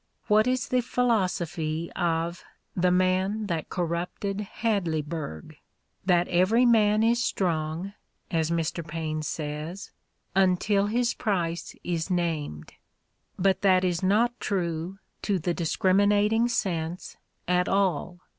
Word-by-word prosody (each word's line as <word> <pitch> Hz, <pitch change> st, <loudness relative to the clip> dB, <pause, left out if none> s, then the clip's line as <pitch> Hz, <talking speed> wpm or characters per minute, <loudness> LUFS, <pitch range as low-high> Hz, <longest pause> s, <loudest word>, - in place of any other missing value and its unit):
What 215 Hz, +2 st, +4 dB
is 255 Hz, 0 st, 0 dB
the 250 Hz, -1 st, +2 dB
philosophy 175 Hz, -10 st, -1 dB
of 170 Hz, +1 st, -1 dB, 0.3 s
"The 180 Hz, 0 st, +2 dB
Man 185 Hz, +4 st, +1 dB
That 170 Hz, -5 st, -3 dB
Corrupted 180 Hz, +3 st, -2 dB, 0.2 s
Hadleyburg"? 160 Hz, -, -2 dB, 0.5 s
"That 175 Hz, -1 st, +3 dB
every 195 Hz, +8 st, +3 dB
man 215 Hz, -2 st, +4 dB
is 235 Hz, +1 st, +3 dB
strong," 170 Hz, -1 st, -1 dB, 0.4 s
as 160 Hz, -2 st, +1 dB
Mr. 170 Hz, 0 st, -1 dB
Paine 155 Hz, 0 st, -3 dB
says, 155 Hz, +5 st, -5 dB, 0.4 s
"until 195 Hz, +2 st, +2 dB
his 240 Hz, +2 st, +1 dB
price 175 Hz, -5 st, -2 dB
is 170 Hz, 0 st, -2 dB
named." 160 Hz, -, -2 dB, 0.6 s
But 190 Hz, 0 st, +2 dB
that 190 Hz, -2 st, +4 dB
is 175 Hz, -2 st, 0 dB
not 225 Hz, +6 st, +2 dB
true, 175 Hz, -1 st, -2 dB, 0.2 s
to 200 Hz, -2 st, 0 dB
the 175 Hz, +1 st, -1 dB
discriminating 205 Hz, +6 st, +2 dB
sense, 180 Hz, -7 st, -2 dB, 0.3 s
at 180 Hz, 0 st, +2 dB
all. 180 Hz, -2 st, 0 dB
180 Hz, 115 wpm, -27 LUFS, 165-205 Hz, 0.6 s, What